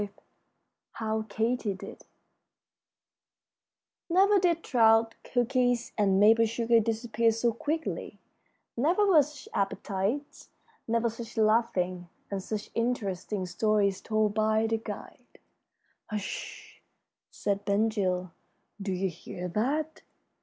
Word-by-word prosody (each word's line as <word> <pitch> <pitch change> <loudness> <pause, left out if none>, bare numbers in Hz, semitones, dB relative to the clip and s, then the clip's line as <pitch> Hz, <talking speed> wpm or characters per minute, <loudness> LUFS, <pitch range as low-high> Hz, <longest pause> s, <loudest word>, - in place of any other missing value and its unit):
V 205 - -3 0.8
HOW 220 -1 -2
KATY 225 -2 0
DID 185 - -10 2.1
Never 390 +4 +5
did 340 -2 +1
trout, 225 -2 +4
cookies, 245 -1 0
and 195 -2 +3
maple 225 +2 +6
sugar 230 +1 +3
disappear 225 0 +1
so 230 +1 0
quickly; 315 +6 -3 0.6
never 340 - +2
were 355 -7 +6
such 290 -1 -8
appetites; 200 +7 -2 0.4
never 230 +1 +1
such 230 0 -7
laughing, 185 -5 +1 0.2
and 195 -1 -2
such 210 +2 -5
interesting 210 -5 -2
stories 200 +1 +1
told 215 -1 +1
by 220 +1 +2
the 225 0 +1
guide. 220 - -9 0.7
"Hush!" 210 -2 -6 0.5
said 200 0 -2
Ben 205 +2 +2
Gile. 185 -5 -1 0.5
"Do 195 0 -2
you 190 +1 0
hear 175 +1 -7
that?" 290 - -1
225 Hz, 110 wpm, -29 LUFS, 200-240 Hz, 2.1 s, maple